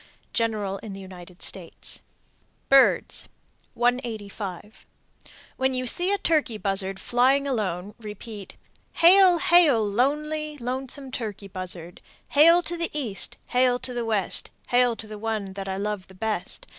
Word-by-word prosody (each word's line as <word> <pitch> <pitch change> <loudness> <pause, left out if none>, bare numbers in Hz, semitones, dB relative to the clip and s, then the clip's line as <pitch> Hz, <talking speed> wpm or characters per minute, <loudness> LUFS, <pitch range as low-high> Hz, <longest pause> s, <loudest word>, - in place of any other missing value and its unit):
General 210 -4 -1
in 215 -3 -8
the 195 - -8
United 180 -2 -10
States. 175 -4 -5 0.7
BIRDS. 275 0 +4 0.5
185. 220 -5 -3 0.7
When 260 0 +1
you 255 0 -1
see 355 +10 +1
a 405 - +2
turkey 300 - +1
buzzard 195 -1 -1
flying 260 +3 +2
alone, 205 -6 -2
repeat, 210 -1 -9 0.4
Hail! 360 +1 +7
Hail! 320 -10 +5
Lonely, 300 +7 -1
lonesome 260 +2 -4
turkey 210 -5 -5
buzzard: 180 -2 -7 0.3
Hail 335 +4 +6
to 345 - -3
the 335 0 -1
East, 215 -9 -3
hail 250 0 +3
to 250 0 -5
the 240 -1 -2
West, 215 -5 +1 0.2
Hail 245 -1 +3
to 225 - -7
the 215 -1 -9
one 215 -3 -3
that 195 0 -6
I 190 - -2
love 205 -1 -3
best. 220 - -3
230 Hz, 135 wpm, -25 LUFS, 200-270 Hz, 0.7 s, Hail